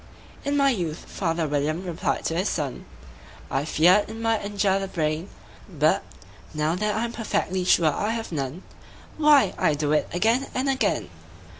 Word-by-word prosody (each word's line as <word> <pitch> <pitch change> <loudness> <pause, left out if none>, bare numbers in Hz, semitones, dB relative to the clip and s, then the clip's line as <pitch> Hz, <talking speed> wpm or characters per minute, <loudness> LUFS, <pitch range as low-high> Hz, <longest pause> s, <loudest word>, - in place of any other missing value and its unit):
"In 285 +1 0
my 275 -1 +4
youth," 170 -9 -3
father 165 -3 -1
William 150 +4 -1
replied 175 -2 -2
to 165 - -1
his 185 +4 0
son, 145 -6 -3 0.7
"I 135 +2 0
feared 180 +7 +4
it 220 - -7
might 225 -1 0
injure 200 -1 +1
the 195 - -3
brain; 160 0 -2 0.4
But, - - +2 0.5
now 155 +1 +1
that 210 +3 -1
I'm 230 +2 -1
perfectly 190 -5 -1
sure 160 -4 +4
I 205 - -1
have 225 -2 -3
none, 145 +3 -4 0.5
Why, 295 -10 +5
I 150 - +3
do 145 0 -1
it 155 - +2
again 225 +9 +1
and 260 +2 0
again." 200 - 0
185 Hz, 165 wpm, -25 LUFS, 155-225 Hz, 0.7 s, Why